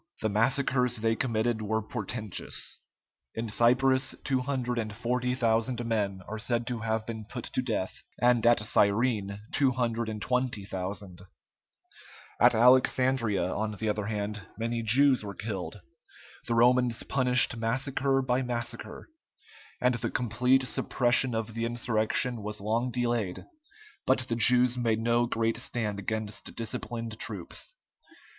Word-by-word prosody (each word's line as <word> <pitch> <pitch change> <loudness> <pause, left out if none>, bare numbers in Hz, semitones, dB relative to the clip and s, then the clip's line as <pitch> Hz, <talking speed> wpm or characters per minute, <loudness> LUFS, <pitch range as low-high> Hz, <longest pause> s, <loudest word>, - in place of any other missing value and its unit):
The 110 - +1
massacres 125 +3 +2
they 115 0 +1
committed 115 -1 0
were 110 +1 -1
portentous. 110 -2 -4 0.6
In 115 0 -3
Cyprus 130 +4 +3
240,000 125 -2 -1
men 100 -4 -1
are 110 +1 -5
said 120 +1 -1
to 120 -1 -3
have 110 0 -1
been 110 -1 -5
put 120 +3 -7
to - - -2
death, 110 -7 -3 0.2
and 120 -1 +3
at 120 -2 +5
Cyrene 100 -1 +1
220,000. 110 -6 -1 1.2
At - - +6
Alexandria, 125 -4 +3
on 105 0 -2
the 110 +1 -2
other 105 -1 -1
hand, 105 -2 -4
many 115 +1 -2
Jews 130 +3 +4
were 100 -1 -6
killed. 105 -4 -5 0.7
The 115 - 0
Romans 120 0 +3
punished 125 -2 +2
massacre 135 +4 0
by 130 0 +1
massacre, 120 -2 -5 0.7
and 125 0 +3
the 115 -1 -2
complete 125 +3 +2
suppression 120 -1 +1
of 115 0 -3
the 115 +1 -2
insurrection 120 0 -1
was 105 +1 -5
long 115 +5 0
delayed, 120 -6 -2 0.6
but 130 - +5
the 115 - -1
Jews 125 +2 +5
made 115 -2 +1
no 120 +1 +2
great 115 -1 0
stand 110 -4 -3
against 110 +2 -4
disciplined 115 0 -5
troops. - - -4
115 Hz, 125 wpm, -29 LUFS, 110-125 Hz, 1.2 s, At